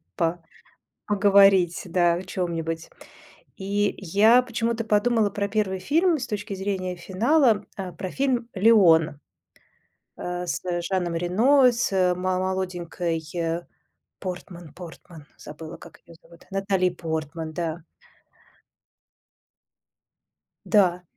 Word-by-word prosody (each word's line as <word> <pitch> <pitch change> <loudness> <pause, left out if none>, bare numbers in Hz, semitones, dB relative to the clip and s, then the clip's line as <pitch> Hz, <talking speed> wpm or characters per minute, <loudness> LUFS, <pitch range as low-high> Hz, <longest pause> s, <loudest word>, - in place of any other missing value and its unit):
по 170 0 -1 0.7
поговорить, 195 -3 +4
да, 175 -1 +2
о 175 - -4
чём-нибудь. 165 -3 -4 0.7
И 200 +1 -1
я 210 +7 +4
почему-то 230 -1 -2
подумала 215 0 +2
про 200 +1 -2
первый 200 -2 -1
фильм 325 - +2
с 255 - -4
точки 210 -1 -4
зрения 190 -2 -3
финала, 215 - +2 0.3
про 185 - -4
фильм 255 -2 -1
"Леон", 180 -8 +4 1.0
а, 180 0 -4
с - - -3 0.2
Жаном 175 -1 -2
Рено, 245 +10 +4
с 190 -6 +1
мо 185 0 -1
молоденькой, 180 -3 -3
э, 170 0 -2 0.6
Портман 175 -3 -8
Портман, 165 -3 -12
забыла 155 +2 -10
как 170 - -15
ее 170 - -14
зовут, 170 0 -19
Натали 195 -1 +1
Портман, 160 -2 -5
да. 165 0 -3 2.8
Да. 180 -4 +3
185 Hz, 105 wpm, -24 LUFS, 170-210 Hz, 2.8 s, поговорить